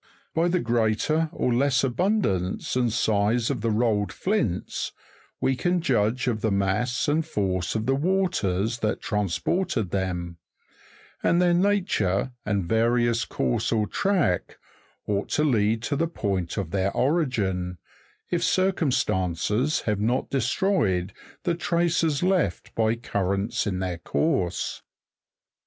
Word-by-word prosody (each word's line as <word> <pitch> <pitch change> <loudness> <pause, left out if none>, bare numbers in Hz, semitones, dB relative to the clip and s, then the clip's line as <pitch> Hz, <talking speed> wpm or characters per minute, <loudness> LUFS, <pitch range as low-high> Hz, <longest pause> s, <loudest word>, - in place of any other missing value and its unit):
By 165 +2 +2
the 180 +1 +1
greater 120 +7 +1
or 125 - 0
less 130 +1 +2
abundance 135 - 0
and 125 -2 +2
size 110 +2 +1
of 125 -6 -3
the 115 - 0
rolled 110 -2 +1
flints, 185 - -2 0.5
we 135 - +1
can 175 +7 +1
judge 125 -4 +1
of 115 -4 -1
the 110 - +1
mass 100 +6 0
and 155 +2 +2
force 95 - -1
of 110 0 -1
the 135 - +2
waters 135 - 0
that 105 -1 -1
transported 105 - -1
them; 90 -3 -2 0.8
and 170 - +3
their 175 -1 +4
nature, 175 - +1 0.2
and 100 -4 0
various 115 +1 +2
course 65 -2 -1
or 110 -2 +2
track, 175 - 0 0.5
ought 100 -1 -1
to 150 - +1
lead 110 -5 +2
to 145 - -1
the 165 +4 +1
point 100 - -2
of 95 -5 -3
their 100 0 0
origin, 105 - 0 0.5
if 175 -1 +1
circumstances 130 - +1
have 105 -2 -1
not 120 +5 0
destroyed 115 - +1 0.3
the 175 -1 +1
traces 170 -2 +1
left 180 - 0
by 110 0 +1
currents 100 -3 -1
in 95 -3 -1
their 90 -2 -3
course. 115 - -1
115 Hz, 130 wpm, -25 LUFS, 100-155 Hz, 0.8 s, their